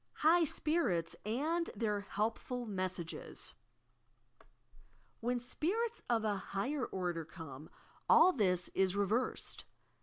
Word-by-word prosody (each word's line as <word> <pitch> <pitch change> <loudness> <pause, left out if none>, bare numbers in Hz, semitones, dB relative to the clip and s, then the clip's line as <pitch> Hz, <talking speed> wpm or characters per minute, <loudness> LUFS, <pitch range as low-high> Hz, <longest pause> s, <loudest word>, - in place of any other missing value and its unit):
HIOB 330 +1 +6
SPIRITS 240 - +1
AND 315 +9 0
THQS 205 -2 -1
HELPTCIj 225 +1 -2
HESBAGIS 185 -3 -3 1.7
When 245 +1 0
"spirits" 430 - -1
of 225 -2 +2
a 205 -2 +1
higher 250 +9 -2
order 175 -3 -2
come, 155 -3 -9 0.4
all 370 - +8
this 180 -7 +2
is 190 0 +1
reversed. 210 +5 0
215 Hz, 100 wpm, -35 LUFS, 185-285 Hz, 1.7 s, all